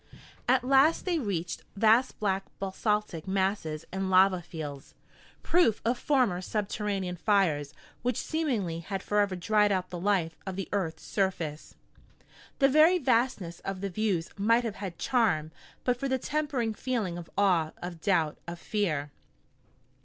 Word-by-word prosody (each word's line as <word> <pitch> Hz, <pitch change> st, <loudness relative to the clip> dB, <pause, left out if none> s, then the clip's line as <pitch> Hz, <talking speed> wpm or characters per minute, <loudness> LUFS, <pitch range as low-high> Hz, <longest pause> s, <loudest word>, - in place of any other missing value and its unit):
At -, -, +4 dB
last 275 Hz, +5 st, +4 dB
they 350 Hz, -3 st, +1 dB
reached 180 Hz, -, -3 dB
vast 225 Hz, +5 st, +3 dB
black 195 Hz, -2 st, 0 dB
basaltic 195 Hz, -3 st, -2 dB
masses 190 Hz, -5 st, -1 dB
and 190 Hz, 0 st, -2 dB
lava 185 Hz, -1 st, +5 dB
fields, 150 Hz, -5 st, -8 dB, 0.5 s
proof 330 Hz, -11 st, +3 dB
of 240 Hz, +1 st, +1 dB
former 250 Hz, -11 st, +2 dB
subterranean 200 Hz, -2 st, -2 dB
fires 165 Hz, -7 st, +2 dB, 0.3 s
which 245 Hz, -1 st, -1 dB
seemingly 235 Hz, -, -1 dB
had 195 Hz, +3 st, -5 dB
forever 205 Hz, -2 st, +1 dB
dried 210 Hz, +3 st, +2 dB
out 185 Hz, -2 st, -1 dB
the 175 Hz, -, -4 dB
life 175 Hz, -4 st, +1 dB
of 190 Hz, -2 st, -5 dB
the 195 Hz, -1 st, -4 dB
earth's 185 Hz, -6 st, -2 dB
surface. 170 Hz, -6 st, -2 dB, 0.8 s
The 275 Hz, -, +5 dB
very 310 Hz, +6 st, +6 dB
vastness 235 Hz, -, 0 dB
of 195 Hz, -1 st, -5 dB
the 200 Hz, -1 st, -3 dB
views 190 Hz, -5 st, -1 dB
might 230 Hz, +4 st, +3 dB
have 225 Hz, -3 st, -4 dB
had 190 Hz, -4 st, -6 dB
charm 160 Hz, -12 st, +1 dB, 0.3 s
but 245 Hz, -1 st, +1 dB
for 275 Hz, -, -1 dB
the 260 Hz, -, +2 dB
tempering 275 Hz, -5 st, -1 dB
feeling 215 Hz, -7 st, -2 dB
of 175 Hz, -1 st, -8 dB
awe, 180 Hz, -6 st, +3 dB
of 175 Hz, -2 st, -7 dB
doubt, 165 Hz, -6 st, +1 dB
of 170 Hz, 0 st, -5 dB
fear. 160 Hz, -8 st, -2 dB
195 Hz, 145 wpm, -29 LUFS, 175-230 Hz, 0.8 s, very